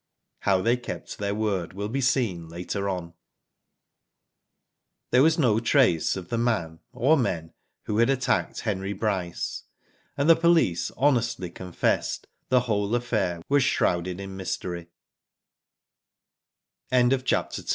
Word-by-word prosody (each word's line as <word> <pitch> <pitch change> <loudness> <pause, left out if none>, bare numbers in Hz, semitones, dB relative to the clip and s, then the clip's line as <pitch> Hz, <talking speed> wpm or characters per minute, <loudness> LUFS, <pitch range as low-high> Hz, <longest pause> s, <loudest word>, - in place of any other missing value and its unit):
How 95 -2 +2
they 120 +2 +3
kept 120 - -7
their 100 0 -1
word 100 -5 -1
will 100 +2 -4
be 135 +5 -2
seen 110 -11 0
later 90 +4 -3
on. 90 -3 -4 2.0
There 125 - +5
was 160 +2 +4
no 120 -8 +3
trace 115 - +3
of 90 -2 -7
the 115 - -1
man, 85 -9 -1
or 140 +7 +3
men, 85 - -2 0.3
who 105 +1 -1
attacked 130 +3 +1
Henry 100 -2 -2
Bryce, 95 -4 -3 0.5
and 140 - +1
the 165 - +8
police 165 - +2
honestly 120 -9 +1
confessed 90 -1 -1 0.2
the 125 -1 +4
whole 105 -2 0
affair 100 -8 -1
was 140 -1 +3
shrouded 90 -2 0 2.7
i 130 +1 +2
110 Hz, 115 wpm, -26 LUFS, 90-125 Hz, 2.7 s, the